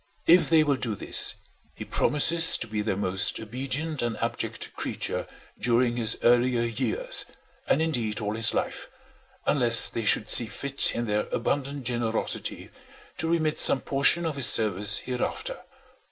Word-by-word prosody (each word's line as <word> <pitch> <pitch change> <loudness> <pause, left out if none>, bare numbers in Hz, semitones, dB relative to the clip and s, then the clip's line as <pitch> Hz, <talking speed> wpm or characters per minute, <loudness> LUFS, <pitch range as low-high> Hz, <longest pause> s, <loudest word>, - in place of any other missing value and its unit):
If 175 +2 +4
they 160 -2 +4
will 145 -3 0
do 115 -5 -4
this, - - +3 0.4
he - - -9
promises 165 +3 +3
to - - -5
be 110 -2 -4
their 105 -3 -3
most 95 -1 -1
obedient 135 +7 -5
and 120 -2 -3
abject - - -5
creature - - -4 0.3
during 120 +1 0
his 115 -2 0
earlier 120 0 +2
years, 420 - 0 0.4
and 160 - +1
indeed 120 -10 -3
all 105 -1 -4
his 115 0 +5
life, - - -4 0.6
unless 120 -5 +5
they 115 - -4
should 105 0 +2
see 115 +1 +5
fit 140 +6 -1
in 120 - -3
their 105 -1 -2
abundant 140 +3 -3
generosity 120 -2 -3 0.5
to 160 - -2
remit 160 -2 -1
some 135 - +5
portion 145 +5 +3
of 155 -3 -4
his 130 -3 +3
service 105 -4 +2
hereafter. 125 -1 -5
120 Hz, 155 wpm, -25 LUFS, 110-145 Hz, 0.6 s, his